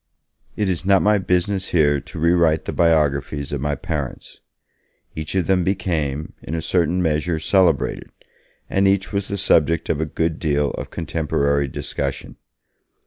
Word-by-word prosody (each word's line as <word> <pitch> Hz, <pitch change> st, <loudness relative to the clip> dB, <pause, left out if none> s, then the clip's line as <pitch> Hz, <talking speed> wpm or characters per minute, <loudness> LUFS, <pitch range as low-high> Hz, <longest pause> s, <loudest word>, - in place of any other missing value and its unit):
It 105 Hz, -, 0 dB
is 90 Hz, -3 st, -1 dB
not 95 Hz, 0 st, +4 dB
my 105 Hz, 0 st, +4 dB
business 95 Hz, +1 st, 0 dB
here 75 Hz, -4 st, +3 dB
to -, -, -11 dB
re 85 Hz, +2 st, +3 dB
write 80 Hz, -3 st, +2 dB
the -, -, -4 dB
biographies 75 Hz, -3 st, +1 dB
of 70 Hz, -2 st, -3 dB
my 75 Hz, 0 st, -1 dB
parents. 75 Hz, -2 st, -5 dB, 0.8 s
Each 80 Hz, +3 st, -5 dB
of 95 Hz, -3 st, +1 dB
them 95 Hz, -2 st, +2 dB
became, 80 Hz, -6 st, -2 dB
in 80 Hz, -, -5 dB
a 80 Hz, -, -2 dB
certain 90 Hz, +1 st, +1 dB
measure, 80 Hz, +1 st, 0 dB
celebrated, 85 Hz, -1 st, +1 dB, 0.6 s
and 95 Hz, 0 st, +2 dB
each 100 Hz, +1 st, +1 dB
was 100 Hz, -1 st, -1 dB
the 100 Hz, -, -3 dB
subject 85 Hz, -4 st, +2 dB
of 80 Hz, -, 0 dB
a -, -, 0 dB
good 80 Hz, +1 st, -2 dB
deal 75 Hz, -2 st, +1 dB
of -, -, -6 dB
contemporary 70 Hz, -4 st, -1 dB
discussion. 70 Hz, +1 st, -4 dB
80 Hz, 160 wpm, -21 LUFS, 75-90 Hz, 0.8 s, not